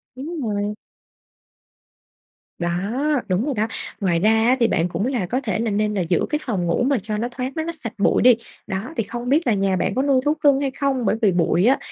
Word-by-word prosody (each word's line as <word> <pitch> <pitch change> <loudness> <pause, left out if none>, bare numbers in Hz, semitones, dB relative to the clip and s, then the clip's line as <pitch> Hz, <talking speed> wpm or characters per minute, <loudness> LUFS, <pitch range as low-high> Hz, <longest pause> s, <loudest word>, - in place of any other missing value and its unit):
Đúng 305 +5 -5
rồi. 210 -3 -2 1.8
Đó, 170 -1 -1 0.6
đúng 190 +7 +1
rồi 290 - -1
đó. 215 +1 0 0.3
Ngoài 175 -4 +2
ra 210 +5 +4 0.2
á 260 +1 +4
thì 235 - +4
bạn 170 -5 +1
cũng 200 - -2
là 245 -8 -1
có 250 +9 -1
thể 215 -6 -2
là 225 -2 0
nên 210 +1 0
là 200 - 0
giữ 170 0 +1
cái 300 - 0
phòng 200 -11 -2
ngủ 170 +7 +1
mà 270 -3 +2
cho 215 +1 -4
nó 230 +3 -1
thoáng 255 +1 -4
nó 320 - -1
nó 335 - -3
sạch 240 -9 -6
bụi 200 - +2
đi. 245 -1 +7 0.3
Đó, 205 +8 -4
thì - - +1
không 240 +4 -5
biết 300 +2 +2
là 230 - +4
nhà 195 -1 +1
bạn 190 +2 -1
có 260 - +2
nuôi 275 -2 +3
thú 295 - +3
cưng 285 -3 +3
hay 275 -2 -1
không? 270 -3 -1
Bởi - - +2
vì 205 - +4
bụi 175 +1 +2
á 265 +4 +5
230 Hz, 240 wpm, -22 LUFS, 195-265 Hz, 1.8 s, đi